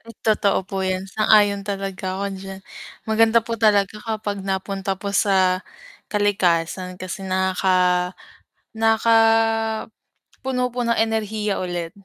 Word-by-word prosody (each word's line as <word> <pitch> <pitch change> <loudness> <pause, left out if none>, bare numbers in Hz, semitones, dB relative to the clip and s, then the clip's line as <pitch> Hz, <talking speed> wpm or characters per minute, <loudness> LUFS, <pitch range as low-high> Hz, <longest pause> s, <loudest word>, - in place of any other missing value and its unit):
Hmm, 230 -1 -14
totoo 210 -2 +2
po 195 0 -4
'yan, 185 0 -1
sang-ayon 205 0 +3
talaga 195 -2 -4
ako 200 - -3 0.2
diyan. 195 0 -8 0.5
Maganda 225 +1 +4
po 230 - -5
talaga 205 -2 +3
kapag 215 -3 -3
napunta 195 0 -3
po 200 -1 -4
sa 190 -2 +3 0.5
kalikasan, 185 -3 0
kasi 185 +1 -6
nakaka 185 -1 +1 0.6
nakakapuno 225 0 +2 0.6
po 245 - -5
ng 235 0 +1
enerhiya 220 -2 -1
ulit. 175 -2 -4
200 Hz, 115 wpm, -22 LUFS, 190-220 Hz, 0.6 s, Maganda